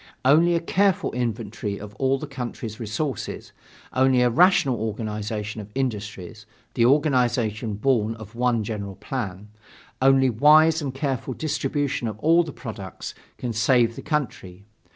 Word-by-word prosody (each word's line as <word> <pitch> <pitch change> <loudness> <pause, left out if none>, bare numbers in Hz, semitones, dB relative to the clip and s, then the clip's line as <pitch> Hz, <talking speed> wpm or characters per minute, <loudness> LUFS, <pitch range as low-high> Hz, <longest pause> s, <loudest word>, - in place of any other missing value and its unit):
Only 165 +6 +5
a - - +2
careful 190 +3 +1
inventory 115 -4 -3
of 105 0 -9
all 135 0 +2
the 150 - -6
country's 120 -5 -6
resources; 120 +3 -4 0.4
only 130 -1 +4
a 120 - +3
rational 175 - +4
organization 110 -1 -4
of 105 - -11
industries 105 -5 -4 0.3
an 115 - +3
organization 125 -6 +2
born 115 -1 +1
of 110 -2 -11
one 120 -2 +1
general 100 -3 -5
plan; 105 -6 -5 0.5
only 135 0 +5
wise 155 +6 +5
and 140 -3 -3
careful 135 -2 -3
distribution 145 -4 -1
of 105 -2 -5
all 165 +8 +4
the 165 -3 -5
products, 105 -9 -8 0.2
can 120 -2 -4
save 115 +1 +3
the - - -7
country. 100 - -4
120 Hz, 140 wpm, -24 LUFS, 105-140 Hz, 0.5 s, Only